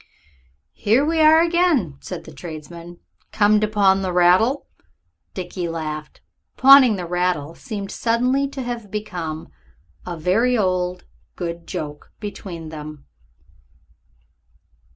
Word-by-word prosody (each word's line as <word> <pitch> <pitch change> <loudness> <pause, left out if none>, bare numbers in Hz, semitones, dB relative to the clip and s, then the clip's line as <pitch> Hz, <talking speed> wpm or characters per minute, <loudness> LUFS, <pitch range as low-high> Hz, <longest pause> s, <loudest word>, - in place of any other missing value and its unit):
"Here 230 +7 +2
we 325 +1 0
are 315 +1 +7
again," 335 - +1
said - - -7
that 160 - -13
tradesman; 170 +3 -9 0.3
"come 210 0 +4
to 215 - +2
pawn 195 -2 +3
the 185 -1 -2
rattle?" 180 +10 +3 0.7
Dickie 180 -1 -4
laughed. 155 -2 -6 0.4
Pawning 265 -4 +8
the 180 -2 -5
rattle 175 -3 -1
seemed 200 -2 -6
suddenly 250 +4 +1
to 275 -1 -6
have 240 -4 -5
become 180 -7 -5 0.5
a 175 -2 -6
very 225 +10 +2
old 180 -2 0
and - - -31 0.3
good 170 -1 -5
joke 150 -1 -6
between 180 -6 -7
them. 150 -2 -9
185 Hz, 120 wpm, -21 LUFS, 170-235 Hz, 0.7 s, Pawning